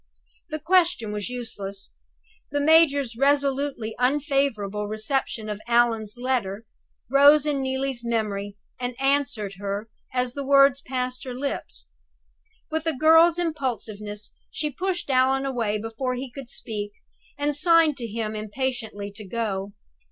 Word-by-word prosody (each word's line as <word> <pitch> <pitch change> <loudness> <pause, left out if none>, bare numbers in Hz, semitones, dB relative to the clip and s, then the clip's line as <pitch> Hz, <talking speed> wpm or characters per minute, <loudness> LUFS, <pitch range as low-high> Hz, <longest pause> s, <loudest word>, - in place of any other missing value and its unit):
The 310 - -2
question 335 - +2
was 210 +1 -3
useless; 200 -5 -6 0.6
the 290 - -1
major's 285 -5 +4
resolutely 275 -3 +1
unfavorable 250 -7 +1
reception 220 +1 -2
of 210 0 -4
Allan's 235 -2 +2
letter 235 -5 -1 0.4
rose 285 +3 +6
in 290 -2 0
Neelie's 265 -2 -2
memory, 205 -4 -2 0.2
and 245 -1 -4
answered 270 -8 0
her 200 +2 -3 0.2
as 250 -1 -1
the 280 - -4
words 275 0 +5
passed 255 0 -3
her 255 -2 -6
lips. 275 +2 -3 0.8
With 315 +1 -2
a 325 - +2
girl's 325 +3 +6
impulsiveness 225 -10 -3 0.2
she 300 -1 -3
pushed 360 0 -2
Allan 265 +1 +3
away 230 -6 0
before 225 +4 -3
he 255 0 -5
could 260 -1 -9
speak, 205 -3 -2 0.4
and 290 0 0
signed 330 -1 +5
to 235 -3 -4
him 220 0 -3
impatiently 215 -2 -3
to 210 +2 -10
go. 200 -1 -3
250 Hz, 130 wpm, -25 LUFS, 215-280 Hz, 0.8 s, rose